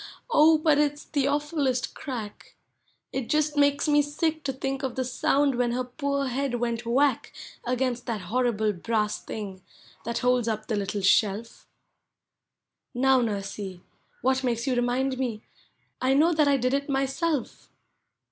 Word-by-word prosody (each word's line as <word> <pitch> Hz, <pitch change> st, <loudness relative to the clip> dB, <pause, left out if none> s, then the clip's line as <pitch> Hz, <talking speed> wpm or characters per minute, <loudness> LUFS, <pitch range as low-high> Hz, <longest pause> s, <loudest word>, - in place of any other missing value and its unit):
Oh, 315 Hz, -2 st, +6 dB
but 305 Hz, -1 st, +3 dB
it 295 Hz, -1 st, +2 dB
's -, -, -11 dB
the 280 Hz, -2 st, 0 dB
awful 295 Hz, +2 st, -1 dB
lest 255 Hz, -2 st, 0 dB
crack! 230 Hz, -7 st, -7 dB, 0.6 s
It 265 Hz, -3 st, -3 dB
just 300 Hz, 0 st, +1 dB
makes 285 Hz, +1 st, +3 dB
ine 295 Hz, 0 st, +5 dB
sick 310 Hz, +2 st, -1 dB
to 270 Hz, -, 0 dB
think 270 Hz, 0 st, -3 dB
of 265 Hz, -3 st, -3 dB
the 260 Hz, -, -1 dB
sound 275 Hz, +2 st, +2 dB
when 240 Hz, -1 st, 0 dB
her 255 Hz, +1 st, -1 dB
poor 280 Hz, +2 st, -2 dB
head 260 Hz, 0 st, -1 dB
went 235 Hz, -1 st, -2 dB
whack 265 Hz, +1 st, +2 dB, 0.3 s
Against 250 Hz, 0 st, -1 dB
that 225 Hz, -4 st, -2 dB
horrible 220 Hz, +1 st, 0 dB
brass 210 Hz, +3 st, -1 dB
thing 195 Hz, -4 st, -6 dB, 0.4 s
that 235 Hz, +1 st, -3 dB
holds 250 Hz, -2 st, +3 dB
up 215 Hz, -1 st, -2 dB
the 220 Hz, -, -2 dB
little 205 Hz, 0 st, -2 dB
shelf. 210 Hz, +3 st, +1 dB, 1.3 s
Now, 265 Hz, +1 st, +4 dB
Xursey, 200 Hz, -4 st, -4 dB, 0.4 s
what 260 Hz, +1 st, +2 dB
makes 235 Hz, -1 st, -1 dB
you 265 Hz, -, +1 dB
remind 255 Hz, +2 st, 0 dB
me? 230 Hz, -5 st, -3 dB, 0.6 s
I 260 Hz, +1 st, +3 dB
know 325 Hz, +5 st, +4 dB
that 305 Hz, -2 st, +3 dB
I 280 Hz, -1 st, +4 dB
did 255 Hz, +1 st, 0 dB
it 280 Hz, +1 st, -1 dB
myself! 275 Hz, +1 st, -1 dB
255 Hz, 160 wpm, -26 LUFS, 230-280 Hz, 1.3 s, Oh